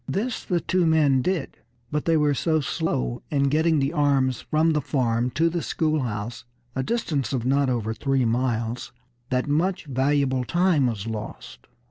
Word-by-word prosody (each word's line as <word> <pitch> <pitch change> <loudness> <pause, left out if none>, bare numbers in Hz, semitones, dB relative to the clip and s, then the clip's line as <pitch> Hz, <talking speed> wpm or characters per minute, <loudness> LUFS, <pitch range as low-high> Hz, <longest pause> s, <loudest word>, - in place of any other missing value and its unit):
This 225 +5 -2
the 175 -2 0
two 185 -2 +1
men 145 -5 +4
did; 175 0 -2 0.3
but 150 0 -1
they 165 -1 +3
were 150 -1 +3
so 160 +3 +1
slow 135 -5 -2
in 140 -2 +2
getting 160 +2 +2
the 140 +2 0
arms 140 -5 +2
from 160 +2 +2
the 150 - +1
farm 125 -3 0
to 165 +1 +3
the 170 0 -1
schoolhouse, 120 -11 -2 0.3
a 130 - 0
distance 140 - -1
of 120 -3 -1
not 135 +1 +2
over 115 -3 -1
three 135 +1 0
miles, 115 0 -1 0.4
that 125 +1 0
much 170 +5 0
valuable 135 -1 +1
time 170 -1 +2
was 110 -5 -3
lost. 105 - -7
140 Hz, 165 wpm, -24 LUFS, 125-160 Hz, 0.4 s, men